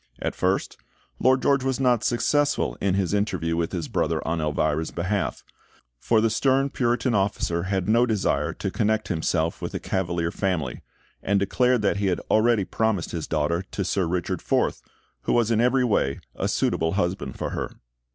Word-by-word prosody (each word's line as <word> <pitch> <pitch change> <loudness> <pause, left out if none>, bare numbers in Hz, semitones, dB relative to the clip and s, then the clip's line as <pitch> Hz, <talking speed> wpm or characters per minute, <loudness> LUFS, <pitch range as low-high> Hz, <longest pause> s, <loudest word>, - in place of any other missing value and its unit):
At - - -2
first, - - -1 0.4
Lord 130 0 +3
George 140 -2 +3
was 135 -1 -1
not 125 -4 +2
successful 145 +4 +1
in 95 -1 +1
his 95 -1 0
interview 90 -6 0
with 85 0 -1
his 85 -4 -3
brother - - -1
on 80 0 0
Elvira's 75 +1 0
behalf; 95 +4 -2 0.6
for 110 - +2
the 115 - +3
stern 135 +4 +2
Puritan 120 -1 0
officer 95 -4 0
had 95 -2 0
no 115 +3 +4
desire 110 -4 0
to - - -4
connect 110 -1 0
himself 80 -1 -1
with - - -4
a - - -1
Cavalier 85 -3 -1
family, 90 -6 -2 0.4
and 100 +1 +1
declared 125 +4 +2
that 100 - +2
he 100 -1 0
had 90 - +1
already 110 -2 +3
promised 110 -6 -1
his 85 -3 -4
daughter 80 +2 0
to 100 - -3
Sir 95 -1 0
Richard 90 0 -2
Forth, - - 0 0.4
who - - +1
was 120 -1 +2
in 115 0 +3
every 125 +2 +3
way 70 - +1 0.2
a - - -1
suitable 80 0 0
husband 90 -8 -2
for - - -3
her. - - -4
100 Hz, 180 wpm, -25 LUFS, 85-120 Hz, 0.6 s, no